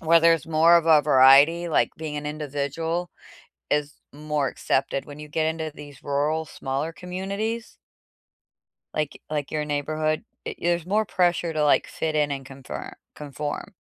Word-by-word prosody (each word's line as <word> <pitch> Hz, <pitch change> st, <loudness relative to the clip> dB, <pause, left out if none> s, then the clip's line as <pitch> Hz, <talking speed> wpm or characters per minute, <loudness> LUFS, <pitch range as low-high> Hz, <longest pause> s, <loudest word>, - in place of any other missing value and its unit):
where 165 Hz, +1 st, +5 dB
there's 165 Hz, -2 st, +4 dB
more 165 Hz, +2 st, +5 dB
of 170 Hz, -1 st, +1 dB
a 155 Hz, -2 st, +6 dB
variety, 145 Hz, +4 st, +6 dB
like, 160 Hz, -, +1 dB
being 150 Hz, -2 st, -5 dB
individual 150 Hz, +4 st, -3 dB, 0.6 s
is 150 Hz, 0 st, -1 dB
more 150 Hz, -1 st, -2 dB
accepted. 135 Hz, +1 st, -1 dB
When 145 Hz, 0 st, -11 dB
you 150 Hz, -, -8 dB
get 155 Hz, +1 st, 0 dB
into 160 Hz, 0 st, -2 dB
these 145 Hz, -3 st, -12 dB
rural 150 Hz, +3 st, 0 dB
smaller 140 Hz, +2 st, -4 dB
communities 200 Hz, +6 st, -4 dB, 1.2 s
like 150 Hz, -2 st, -3 dB
like 150 Hz, -2 st, -2 dB
your 155 Hz, -1 st, -1 dB
neighborhood, 155 Hz, +1 st, -1 dB, 0.2 s
i -, -, -3 dB
there's 175 Hz, -1 st, 0 dB
more 210 Hz, +3 st, +2 dB
pressure 175 Hz, -2 st, +1 dB
to, 155 Hz, -1 st, 0 dB
like, 145 Hz, -, +3 dB
fit 160 Hz, -1 st, -3 dB
in 150 Hz, -1 st, +2 dB
and 135 Hz, -2 st, -4 dB
confir 135 Hz, 0 st, -8 dB, 0.2 s
conform. 145 Hz, 0 st, -6 dB
155 Hz, 150 wpm, -25 LUFS, 145-165 Hz, 1.2 s, a